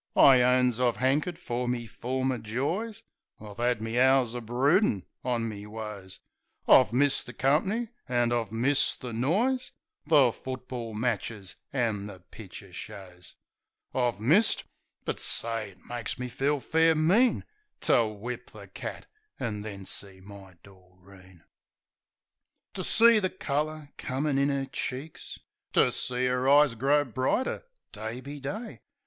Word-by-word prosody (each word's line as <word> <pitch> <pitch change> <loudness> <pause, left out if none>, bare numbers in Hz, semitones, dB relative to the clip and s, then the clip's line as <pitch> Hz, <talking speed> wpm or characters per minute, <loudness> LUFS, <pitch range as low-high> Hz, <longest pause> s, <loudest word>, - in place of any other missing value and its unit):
I 130 -3 +8
owns 125 -1 +3
I've 120 -4 +2
'ankered 145 +7 +1
fer 120 +1 -3
me 120 -1 -1
former 130 +3 -2
joys; 170 - -3 0.4
I've 105 0 -11
'ad 120 -2 +1
me 115 +2 -1
hours 130 -2 +4
o' 120 - -4
broodin' 125 - +2 0.2
on 120 -2 0
me 105 -1 -7
woes; 105 -3 -8 0.5
I've 125 -4 +7
missed 140 +3 +1
the 120 - -8
comp'ny, 190 - +1 0.2
an' 120 -1 +2
I've 115 -4 -1
missed 125 +5 +1
the 125 -2 -5
noise, 210 - 0 0.3
The 145 -6 +6
football 125 -3 -6
matches 110 -3 -3 0.2
an' 110 -7 -1
the 95 -3 -10
picter 100 -3 -11
shows. 95 -3 -10 0.6
I've 120 -5 0
missed 170 - +3 0.2
— - - -50
^but, - - -2
say, 115 -2 0
it 95 -1 -20
makes 120 -2 -4
me 125 0 -4
feel 140 +4 0
fair 160 +2 +3
mean 195 +11 +3 0.4
To 115 -2 +4
whip 110 +3 -6
the - - -11
cat; - - -7 0.3
an' 105 -4 -3
then 100 -2 -7
see 95 -1 -5
my 95 -1 -13
Doreen. 95 -1 -18 1.3
To - - -4
see 230 -1 +6
the 190 -2 0
colour 155 -3 -3
comin' 135 +2 -1
in 140 +1 +3
'er 140 -1 -1
cheeks, 135 +3 -5 0.4
To - - +4
see 125 0 -1
'er 125 +1 +1
eyes 145 -2 +6
grow 140 +5 +2
brighter 130 - -1 0.3
day 110 +3 -6
be 140 +2 -8
day. 210 - -6
125 Hz, 145 wpm, -28 LUFS, 110-140 Hz, 1.3 s, I